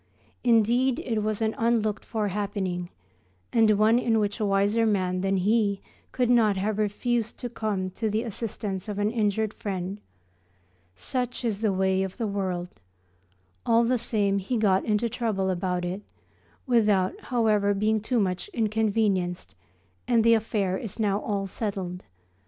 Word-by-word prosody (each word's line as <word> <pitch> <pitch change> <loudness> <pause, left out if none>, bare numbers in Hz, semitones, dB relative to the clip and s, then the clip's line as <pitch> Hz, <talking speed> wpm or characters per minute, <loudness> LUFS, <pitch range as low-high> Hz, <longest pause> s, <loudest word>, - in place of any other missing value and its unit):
Indeed, 240 +2 +3
it 225 -3 -2
was 215 +1 -1
an 220 0 +1
unlooked 225 -3 +1
for 215 -3 -2
happening, 190 -3 -3 0.6
and 225 -2 +5
one 220 +3 +4
in 230 -2 +1
which 210 +1 -1
a 215 - +1
wiser 200 +3 +2
man 185 -4 +1
than 195 0 +1
he 200 +1 +2 0.3
could 250 -2 +1
not 225 -4 +4
have 210 +2 -1
refused 230 +2 -1
to 245 - -5
come 205 -5 -2
to 220 +4 -2
the 215 +2 0
assistance 210 -3 -4
of 205 - -4
an 205 +1 +1
injured 215 -1 0
friend. 195 0 -4 0.9
Such 250 - -3
is 215 -3 -1
the 215 -3 +2
way 190 0 +1
of 190 -1 -4
the 235 - -1
world. 185 -4 -2 0.9
All 230 0 +4
the 245 +1 +1
same 205 -4 +1
he 215 +6 -2
got 195 -3 +3
into 215 +2 +1
trouble 215 -5 -1
about 180 0 -1
it, 185 +3 -4 0.6
without, 210 -7 +3
however, 215 -4 +2
being 215 +2 +1
too 240 +3 0
much 185 - -1
inconvenienced, 210 - 0 0.5
and 230 -2 +3
the 230 0 +6
affair 205 -4 0
is 220 -3 -6
now 205 -2 +1
all 200 -2 -2
settled. 190 -3 -4
210 Hz, 155 wpm, -26 LUFS, 195-225 Hz, 0.9 s, the